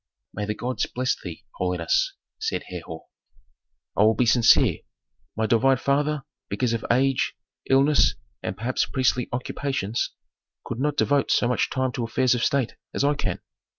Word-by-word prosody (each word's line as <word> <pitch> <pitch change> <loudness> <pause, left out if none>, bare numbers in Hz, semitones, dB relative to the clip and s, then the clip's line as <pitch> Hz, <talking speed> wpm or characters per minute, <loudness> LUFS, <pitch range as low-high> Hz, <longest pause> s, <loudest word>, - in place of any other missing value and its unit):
"May 105 - -3
the 105 - -2
gods 125 +3 -2
bless 125 0 -1
thee, 85 -4 -8
holiness," 90 -2 +1 0.3
said - - -2
Herhor. 80 -2 -7 0.9
"I - - +2
will 110 +1 +5
be 125 - +2
sincere. 115 0 +5 0.6
My 110 - 0
divine 130 +4 +3
father, 145 +2 0 0.3
because 125 -2 0
of 115 - -2
age, 135 +2 +2 0.3
illness, 140 +3 +4 0.3
and 95 - -4
perhaps 120 +4 0
priestly 125 -2 +1
occupations, 125 -3 -2 0.6
could 120 - -5
not 145 +2 0
devote 140 -1 +2
so 120 - +3
much 125 - +1
time 130 -1 0
to 120 - -3
affairs 120 +2 +2
of 120 -1 -1
state 135 -4 +1 0.2
as - - +1
I 145 +1 +3
can. 145 - -3
125 Hz, 155 wpm, -25 LUFS, 110-135 Hz, 0.9 s, will